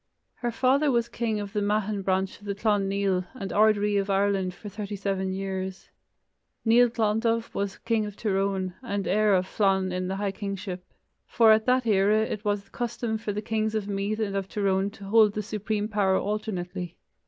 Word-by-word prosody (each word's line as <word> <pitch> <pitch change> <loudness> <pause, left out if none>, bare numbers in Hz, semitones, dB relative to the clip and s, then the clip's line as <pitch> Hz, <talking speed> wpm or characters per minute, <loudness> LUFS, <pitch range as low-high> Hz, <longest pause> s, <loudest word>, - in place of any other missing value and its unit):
Her 240 - -2
father 260 +5 +2
was 235 -3 +2
king 220 -3 -1
of 205 0 -6
the 210 - 0
Meathan 205 0 0
branch 190 0 0
of 205 - -15
the 200 -1 -2
Clan 205 -2 +1
Nial, 195 -2 0
and 195 -6 -5
ard 215 0 +5
ri 205 0 +1
of 200 0 -1
Ireland 195 -2 +1
for 210 - -10
thirty 205 0 -5
seven 195 -1 -2
years. 190 0 -4 0.7
Nial 240 +2 +6
Glondubh 225 0 0
was 200 -1 -2
king 225 -2 0
of 205 - -8
Tir 210 -4 -1
Eoghain, 195 -1 0
and 200 -5 -3
heir 210 +1 +3
of 185 0 +1
Flann 190 -1 +1
in 180 0 -2
the 190 - -2
high 200 0 -1
kingship, 195 -2 -5 0.4
for 225 -2 +5
at 220 +2 +3
that 255 0 +3
era 210 0 +3
it 210 -1 -5
was 205 -1 0
the 195 - -28
custom 235 -2 -3
for 220 -1 -3
the 210 +1 -4
kings 220 0 -1
of 210 -2 -1
Meath 200 +1 -1
and 200 -3 -1
of 195 -1 -2
Tyrone 195 -1 +1
to 200 -1 -14
hold 215 0 +5
the 210 - -2
supreme 210 0 -2
power 200 -3 +2
alternately. 185 -4 -3
205 Hz, 200 wpm, -26 LUFS, 195-220 Hz, 0.7 s, Nial